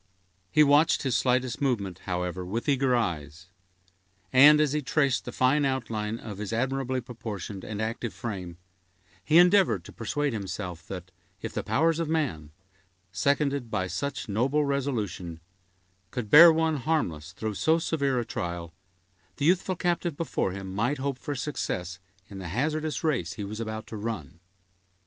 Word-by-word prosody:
He 155 - +5
watched 145 +2 +4
his 130 -3 0
slightest 125 0 +1
movement, 100 -10 -1
however, 90 0 -2
with 110 +9 -4
eager 135 -3 +3
eyes; 80 -7 -3 0.9
and, 145 +4 +8
as 150 -2 +2
he 150 - 0
traced 140 -1 +1
the 125 - -5
fine 130 +4 +2
outline 115 -5 -2
of 105 -4 -8
his 105 -1 -4
admirably 130 +2 -1
proportioned 110 -5 -7
and 105 -1 -5
active 115 +1 -2
frame, 90 -7 -6 0.7
he 155 - +4
endeavored 175 - +5
to - - -11
persuade 140 +5 -2
himself, 90 -4 -5
that, 95 -1 -7 0.3
if - - -4
the - - -1
powers 165 +2 +1
of 165 -2 -1
man, 130 - -1 0.6
seconded 140 +2 0
by 95 - -1
such 140 +8 -4
noble 130 +8 +1
resolution, 110 - -2 0.7
could 120 -5 -5
bear 165 +3 +11
one 160 -1 +1
harmless 90 - -1
through 110 +3 -3
so 160 - +2
severe 140 -6 0
a 120 - -2
trial, 85 -5 -5 0.6
the 140 - -1
youthful 185 +2 +2
captive 175 -3 -1
before 160 - -1
him 95 0 -6
might 120 +9 0
hope 135 -1 -3
for 145 0 -4
success 90 - -3 0.3
in 100 - -9
the 90 - -6
hazardous 150 - -1
race 125 - 0
he 105 - -6
was 105 +2 -6
about 110 -1 -4
to 110 - -7
run. 100 -7 -5
120 Hz, 160 wpm, -27 LUFS, 100-145 Hz, 0.9 s, bear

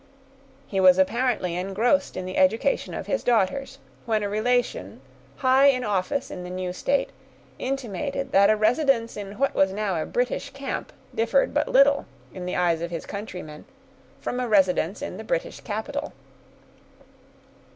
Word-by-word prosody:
He 195 - -2
was 185 -1 +7
apparently 205 -2 +1
engrossed 195 +10 0
in 185 - -4
the 185 - -5
education 225 - +2
of - - -5
his - - -1
daughters, 245 +4 +1 0.3
when 215 -2 +1
a 205 - -1
relation, 215 - -1 0.4
high 260 - +4
in 255 -2 +3
office 210 +6 -1
in 180 - -6
the 180 - -7
new 180 0 -4
state, 275 +9 0 0.5
intimated 275 +2 -3
that 200 +1 +5
a 215 - +5
residence 230 +2 +2
in 200 0 -7
what 275 +3 +1
was 190 0 +3
now 195 -4 -1
a - - -4
British 250 +3 -1
camp 275 -1 -5 0.2
differed 230 +5 +2
but 295 +1 +1
little, 280 +2 +4 0.3
in 180 -1 -6
the 180 - -2
eyes 170 -2 +1
of 170 - -3
his 170 -1 -5
countrymen, 180 -7 -7 0.5
from 245 - -3
a 250 - -1
residence 190 -3 +2
in - - -5
the - - -7
British - - -2
capital. 275 +7 -4
215 Hz, 160 wpm, -25 LUFS, 185-265 Hz, 0.5 s, was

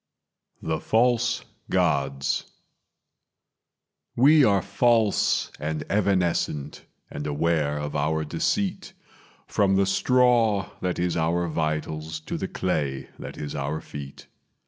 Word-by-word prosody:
The 80 -1 -1
False 120 +2 +1 0.2
Gods 70 -6 0 1.7
"We 145 +4 +6
are 100 -6 +3
false 110 +1 +2
and 75 +1 -3
evanescent, 90 -7 0 0.3
and 75 +1 -5
aware 75 0 0
of 75 0 -4
our 80 +2 0
deceit, 95 +5 -1 0.5
From 95 -1 +2
the 100 0 +3
straw 115 -1 +3
that 90 -1 -1
is 90 0 0
our 85 +1 +1
vitals 80 0 -2
to - - -5
the - - -3
clay 70 -7 -2
that - - -8
is 75 -1 -5
our 75 +2 -2
feet. 70 -2 -9
85 Hz, 110 wpm, -25 LUFS, 75-100 Hz, 1.7 s, We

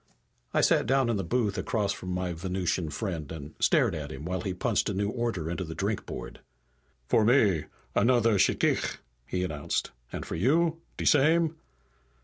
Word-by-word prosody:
I - - +2
sat - - +3
down 135 -2 +3
in 110 - 0
the 95 - -2
booth 105 +2 0
across 100 -3 0
from 90 - -7
my 90 -1 -2
Venusian 90 -1 -2
friend, 80 -3 -4
and 80 -1 -7
stared - - +3
at 75 -1 -5
him 75 +1 -7
while 90 +1 -2
he 95 - -2
punched 90 - 0
a - - -2
new 100 +1 0
order 115 -9 -2
into 85 +3 -2
the 80 -2 -7
drinkboard. 100 +5 -4 0.7
"For 110 - +4
me, 105 - +4 0.3
another 115 -2 +3
shchikh," - - +2 0.3
he 90 0 -1
announced. 75 -5 -2 0.2
"And - - -5
for - - -6
you? 160 - +2 0.2
De - - -3
same?" 160 +3 +4
95 Hz, 170 wpm, -28 LUFS, 85-120 Hz, 0.7 s, For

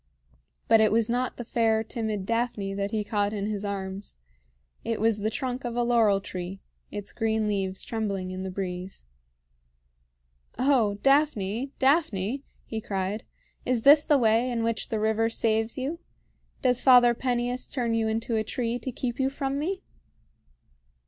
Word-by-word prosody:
But 225 - +6
it 215 - +4
was 225 0 +2
not 245 +1 -1
the 240 - -6
fair, 225 -1 +2
timid 220 -4 -3
Daphne 230 -3 -1
that 200 0 -2
he 215 0 -1
caught 205 -1 0
in 200 -2 -2
his 210 -1 -3
arms; 195 - -5 0.7
it 230 -1 -2
was 220 0 +2
the 215 +1 0
trunk 255 +3 -3
of 240 -1 -4
a 240 - +1
laurel 230 -4 +3
tree, 185 -1 -6 0.3
its 205 -1 -5
green 220 -1 0
leaves 195 -2 -1
trembling 200 -5 -3
in 185 0 -5
the 190 - -4
breeze. 185 - -5 1.5
"O 250 -7 +3
Daphne! 270 -4 +2
Daphne!" 265 - +1 0.2
he 220 -1 -4
cried, 195 +1 -3 0.4
"is 245 -3 0
this 290 +1 +8
the 295 - +4
way 230 0 +3
in 235 -2 -1
which 230 -1 -2
the 220 - -1
river 220 +1 +1
saves 225 0 +1
you? 280 +6 -3 0.6
Does 250 -2 +3
Father 245 -2 +7
Peneus 245 0 -1
turn 240 -4 -1
you 225 -1 +1
into 225 +1 -1
a 220 - +1
tree 235 +2 -2
to 260 - -4
keep 240 0 -4
you 265 0 +2
from 275 0 -2
me?" 375 +5 -3
225 Hz, 160 wpm, -27 LUFS, 205-245 Hz, 1.5 s, this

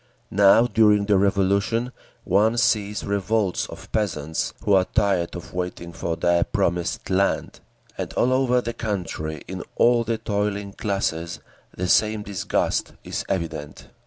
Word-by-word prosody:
Now, 100 +4 +6
during 105 -4 +4
the 100 -2 +3
Revolution, 100 +5 +1 0.3
one 110 +5 +2
sees 110 -3 +1
revolts 100 -1 0
of - - -11
peasants 80 -8 -1
who 100 - +2
are 95 -1 +5
tired 100 -6 +1
of 85 - -9
waiting 90 -1 -4
for 85 0 -3
their 85 0 +2
promised 85 +1 -1
land; 100 +1 0 0.4
and - - -3
all 125 +1 +2
over 125 -1 +2
the 115 -1 -4
country, 85 -8 -4
in 95 0 -5
all 120 0 +4
the 115 0 -1
toiling 100 -2 -2
classes, 85 -6 -2 0.4
the 90 - -1
same 110 +2 +3
disgust 100 -3 -1
is - - -4
evident. 80 -5 -4
100 Hz, 140 wpm, -23 LUFS, 90-110 Hz, 0.4 s, Now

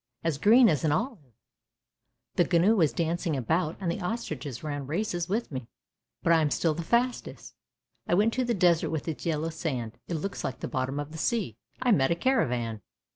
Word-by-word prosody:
as 160 -4 -1
green 230 - +7
as 155 -6 +1
an 155 - +2
olive. 155 - -3 1.0
The 175 - +3
gnu 200 +7 +4
was 160 - +3
dancing 165 +2 -1
about, 160 +6 0
and 180 -4 -1
the 195 - -4
ostriches 155 - -4
ran 145 -3 -4
races 175 +1 -2
with 225 +1 -1
me, 130 -4 -5 0.6
but 170 - +4
I 165 - +5
am 150 - +2
still 160 +2 +1
the 165 - -4
fastest. 240 +8 -1 0.5
I - - +3
went 215 +4 +3
to 255 - 0
the 240 -1 0
desert 175 -3 +3
with 160 -1 -3
its 160 +1 -4
yellow 160 0 -1
sand. 130 -9 -4
It 170 - -2
looks 195 +5 -4
like 130 - -3
the - - -2
bottom 130 +2 -2
of 145 +1 -5
the 160 - -7
sea. 225 +4 0 0.3
I 250 - +3
met 135 -10 +4
a 170 - +2
caravan 125 - 0
165 Hz, 200 wpm, -28 LUFS, 145-200 Hz, 1.0 s, green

